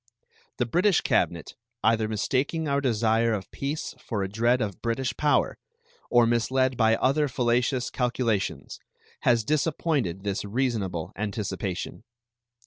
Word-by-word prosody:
The 125 - +1
British 180 - +3
cabinet, 85 -1 0 0.3
either 110 0 +3
mistaking 135 +9 -1
our 140 0 +1
desire 115 -2 +2
of 100 -3 -4
peace 145 +3 -4
for 105 -4 -2
a - - -1
dread 120 +5 +2
of 105 -5 -3
British 120 +1 -1
power 150 -1 +1 0.5
or 120 -1 +5
misled 130 +3 +1
by 115 -1 +4
other 145 +5 +2
fallacious 125 0 0
calculations, 120 -5 -1 0.4
has 120 -2 +3
disappointed 145 - 0
this 100 -1 -2
reasonable 105 -7 -2
anticipation. 100 -3 -4
120 Hz, 125 wpm, -26 LUFS, 105-130 Hz, 0.5 s, or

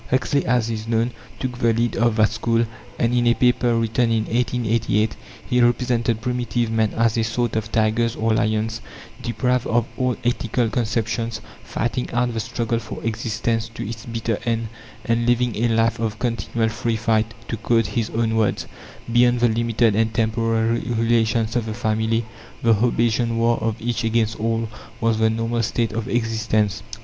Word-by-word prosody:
Huxley, 130 +2 +1
as 120 -2 +2
is 110 0 -4
known, 115 +1 +1 0.3
took 125 -1 -4
the 115 -2 +3
lead 115 0 0
of 120 -1 +2
that 110 -1 +4
school, 115 +1 +1 0.3
and 115 +1 +1
in 120 -1 +2
a 120 - +4
paper 125 -1 +3
written 115 +1 +1
in 110 -1 +1
1888 115 -2 0 0.3
he 125 0 +2
represented 120 -2 +1
primitive 120 -1 -1
men 110 -1 +2
as 115 0 +2
a - - +2
sort 115 0 -1
of 110 0 -2
tigers 115 +1 +1
or 110 0 +1
lions, 110 0 0 0.4
deprived 125 +2 0
of 115 0 +2
all 125 -2 +1
ethical 120 -1 0
conceptions, 115 -1 -1 0.2
fighting 120 +2 -2
out 120 0 +1
the 115 - -2
struggle 115 +1 -2
for 105 -1 -8
existence 115 0 -1
to - - -4
its 115 +2 -7
bitter 115 -1 -2
end, 115 -2 -1 0.4
and 115 -1 +1
living 120 -1 +2
a 115 +3 +1
life 115 0 +2
of 110 -2 -2
"continual 115 -1 -1
free 115 +1 -1
fight"; 110 0 +1
to - - -2
quote 115 +1 +1
his 115 -2 -2
own 115 0 0
words 110 -2 +1 0.5
"beyond 120 0 +4
the 120 - +4
limited 115 -1 +2
and, 110 0 +1
temporary 115 0 +1
relations 115 -1 +1
of 120 -2 0
the 110 - -4
family, 110 0 0 0.4
the 115 -1 +5
Hobbesian 115 +1 +1
war 115 +1 +3
of 110 0 -2
each 120 +1 -2
against 115 -1 0
all 115 +1 0 0.3
was 115 -2 +1
the 110 0 +4
normal 115 +1 -1
state 115 +1 0
of 115 0 -3
existence." 110 -3 0
115 Hz, 175 wpm, -22 LUFS, 110-120 Hz, 0.5 s, the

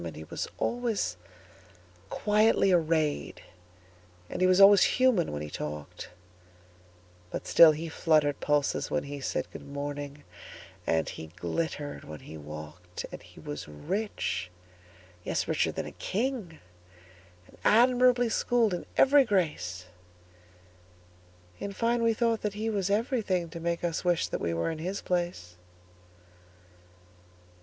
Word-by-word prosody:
And 80 -3 -6
he 80 - -8
was 80 - -5
always 230 - -1 0.9
quietly 210 -1 +3
arrayed, 155 - 0 0.9
And - - -4
he 185 - +5
was 185 +1 +4
always 200 0 +8 0.2
human 250 -9 +3
when 75 0 -4
he 75 - -6
talked; 75 -1 -6 1.2
But - - -5
still 165 -2 +8
he 155 +2 -4
fluttered 155 -3 +2
pulses 145 -1 0
when - - 0
he 145 0 -7
said,"Good - - -4
morning," 145 0 -6 0.6
and 80 -1 +1
he 80 - -7
glittered 145 - -4
when 75 -2 -9
he 80 - -10
walked. 75 +4 -8
And - - -8
he - - -16
was 75 0 -6
rich,—yes, 90 - -5
richer - - +1
than - - -4
a - - -7
king,—And 90 - -7
admirably 245 +1 +5
schooled 230 -2 +2
in 175 - -4
every 280 +1 +6
grace:In 90 - -7
fine, 235 +3 +1
we 230 -1 +2
thought 230 -1 +1
that 210 -1 -2
he 220 +2 -2
was 200 -2 -1
everythingTo 200 -7 -1
make 170 +1 -2
us 170 -2 -1
wish 175 -2 +1
that - - -3
we 85 - -1
were 85 - -1
in 160 - -6
his 185 +5 -3
place. 175 - -3
145 Hz, 125 wpm, -29 LUFS, -, 1.2 s, always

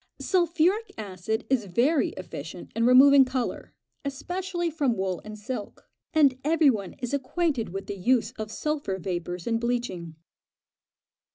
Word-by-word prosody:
Sulphuric 360 +4 +2
acid 215 +2 -3
is 260 -5 +1
very 250 - +2
efficient 165 -2 -8
in 230 +1 +2
removing 270 +2 +8
colour, 255 -1 -3 0.3
especially 345 +5 -3
from 280 -7 0
wool 190 -2 -2
and 215 0 -8
silk, 215 0 -6 0.2
and 280 -5 +4
every 310 -1 +4
one 200 -5 -4
is 250 0 -5
acquainted 280 -2 0
with 195 +2 -5
the 200 - -5
use 235 +2 +2
of 215 -3 -6
sulphur 285 -5 -2
vapours 175 -1 -4
in 230 -1 0
bleaching. 230 -9 -3
245 Hz, 140 wpm, -27 LUFS, 200-290 Hz, 0.3 s, removing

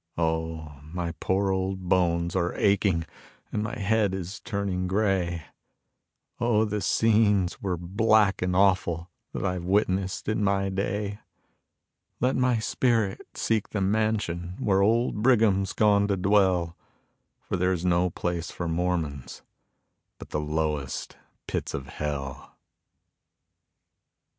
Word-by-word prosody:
Oh, 80 -3 -2
my 85 +3 -4
poor 95 +1 +1
old 95 -1 -2
bones 85 -1 +1
are 85 -1 0
aching 100 -4 +2 0.5
and 105 - -1
my 105 +3 -4
head 105 -2 +1
is 95 +3 -6
turning 100 -5 -2
gray; 95 -4 0 1.0
Oh, 115 -2 +3
the 105 -1 -2
scenes 105 -4 +2
were 95 -3 -1
black 100 +3 +2
and 90 0 0
awful 90 -3 +2 0.2
that - - -4
I've 90 -2 -1
witnessed 95 0 0
in 110 0 0
my 95 -1 +1
day. 100 +2 -2 1.0
Let 125 +2 +1
my 125 -2 +2
spirit 110 -2 0
seek 110 -2 0
the 105 - -2
mansion 95 -4 0
where 95 -1 +2
old 110 +1 +2
Brigham's 105 -6 +3
gone 100 -1 +3
to 100 -1 0
dwell, 95 -3 +2 0.7
For - - -3
there's 90 -1 0
no 90 0 +3
place 85 -1 -3
for 85 - -4
Mormons 80 -5 -2 0.7
but - - -12
the - - -1
lowest 75 -3 -2 0.3
pits - - -3
of 70 - -5
hell. 70 -2 -5
95 Hz, 125 wpm, -26 LUFS, 85-105 Hz, 1.0 s, Oh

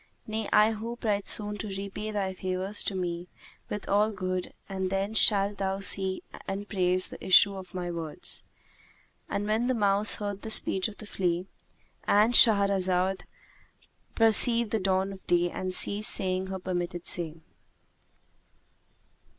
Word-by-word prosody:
Nay 220 0 -4
I 210 +1 +4
hope 230 +2 -7
right 205 -3 -1
soon 210 -1 -1
to 215 - -4
repay 200 +2 -6
thy 200 -3 -3
favours 185 +2 -4
to 195 - -2
me 175 -1 -4 0.4
with 210 - -6
all 205 +2 +2
good 185 -3 -4 0.2
and 190 -1 -3
then 195 +2 -2
shalt 200 -2 +5
thou 195 0 -2
see 190 -1 +1 0.2
and 195 +1 -5
praise 185 -2 -1
the - - -11
issue 195 +2 +5
of 185 -1 -10
my 175 -1 -4
words." 165 -3 -6 0.9
And 200 +1 -3
when 220 +3 0
the 255 - 0
mouse 205 -1 +3
heard 205 -1 -5
the 220 - -7
speech 190 -3 +4
of 215 - -11
the 215 - -11
flea, 180 -3 -2 0.6
And 215 +4 +3
Shahrazad 195 -4 +4 0.9
perceived 225 0 +4
the 220 - 0
dawn 190 0 -1
of 190 - -15
day 175 0 +1
and 185 0 -4
ceased 205 +3 +2
saying 185 -1 0
her 190 0 -5
permitted 175 -1 -4
say. 165 -3 -2
195 Hz, 150 wpm, -27 LUFS, 185-210 Hz, 0.9 s, shalt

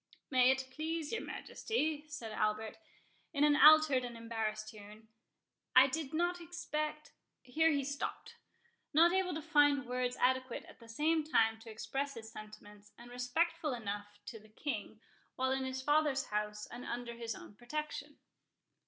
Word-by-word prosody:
"May 255 -1 +5
it 260 0 +2
please 315 +2 -3
your 450 - -1
Majesty," 310 -9 -2
said 245 -8 -6
Albert, 215 +3 -1 0.5
in 285 -1 +2
an 295 -1 +5
altered 305 -3 +7
and 240 -1 -6
embarrassed 220 -2 -3
tone, 210 +1 -13 0.7
"I 255 +1 +10
did 275 +1 -3
not 350 +2 0
expect"— 305 -3 -4 0.3
Here 310 +6 +2
he 285 -3 +1
stopped, 285 +2 -4 0.6
not 340 +3 +6
able 375 -3 +1
to 315 - -4
find 290 -3 +4
words 250 0 -2
adequate 260 0 +1
at - - -15
the 230 - -15
same 310 +7 +1
time 225 -7 +2
to 225 +1 -12
express 270 +6 -3
his 220 -1 -9
sentiments, 210 -1 -12
and 240 +1 -12
respectful 300 +5 0
enough 205 -2 -5
to 225 - -7
the 215 +1 -19
King, 220 -2 -5 0.3
while 260 0 0
in 265 0 0
his 260 0 -4
father's 295 -1 +2
house, 210 0 -3
and 245 +1 -9
under 240 0 -4
his 230 -1 -5
own - - -11
protection. 290 +5 -5
260 Hz, 160 wpm, -34 LUFS, 225-305 Hz, 0.7 s, I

